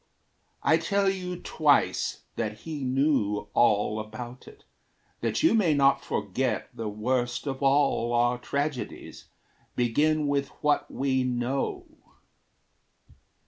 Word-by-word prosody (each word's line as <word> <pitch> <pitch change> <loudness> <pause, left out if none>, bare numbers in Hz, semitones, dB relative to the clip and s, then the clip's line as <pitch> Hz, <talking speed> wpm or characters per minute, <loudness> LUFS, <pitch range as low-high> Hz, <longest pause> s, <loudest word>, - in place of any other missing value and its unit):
I 160 - +5
tell 195 +4 +1
you 180 -2 -5
twice 150 -3 +1
that 110 -1 -3
he 155 -4 -5
knew 130 -6 +1
all 105 -2 +3
about 120 +3 -8
it, 430 0 -15 0.6
That - - -1
you 325 - +5
may 185 -9 +3
not 140 -1 +3
forget 125 -6 -2
the 115 -2 -4
worst 120 +4 -1
of 135 -1 -4
all 135 -4 +2
Our 120 +1 +2
tragedies 140 +1 -4 0.5
begin 150 +6 +2
with 140 -1 0 0.2
what 150 0 +2
we 130 -1 0
know. 125 +2 -2
135 Hz, 115 wpm, -27 LUFS, 120-150 Hz, 0.6 s, I